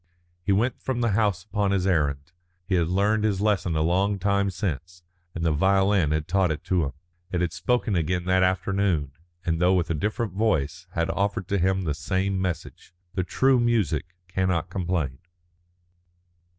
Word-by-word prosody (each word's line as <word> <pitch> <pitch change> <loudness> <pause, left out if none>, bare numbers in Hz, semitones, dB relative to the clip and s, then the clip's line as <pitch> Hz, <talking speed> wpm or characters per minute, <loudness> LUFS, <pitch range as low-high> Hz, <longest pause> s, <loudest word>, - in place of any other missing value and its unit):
He 100 - 0
went 110 +6 +1
from 130 -2 -2
the 115 -2 +2
house 100 -3 +1
upon 100 0 -1
his 95 -2 +1
errand. 75 -4 0 0.3
He 95 - -2
had 85 -3 +2
learned 100 +4 +2
his 105 -3 +1
lesson 100 -5 +1
a 80 - +2
long 95 +5 +2
time 100 +1 +1
since, 85 -2 -4 0.3
and 85 -1 -2
the 80 - +3
violin 95 +1 +3
had 75 0 -1
taught 95 0 +2
it 75 - -5
him. 80 -7 +1 0.4
It 90 - 0
had 85 -2 -1
spoken 105 +4 0
again 90 +1 0
that 95 0 +3
afternoon, 95 -5 +1 0.3
and 80 0 0
though 90 +1 +4
with 85 -2 0
a - - +2
different 105 +5 -2
voice, 95 -5 0
had 85 -1 0
offered 100 -2 -1
to 100 - +1
him 95 +1 +1
the 80 -4 -1
same 95 +6 -1
message. 90 -1 -5 0.2
The 95 - 0
true 130 +8 +3
music 90 - 0
cannot 90 -2 -1
complain. 85 -8 -2
95 Hz, 175 wpm, -25 LUFS, 85-100 Hz, 0.4 s, though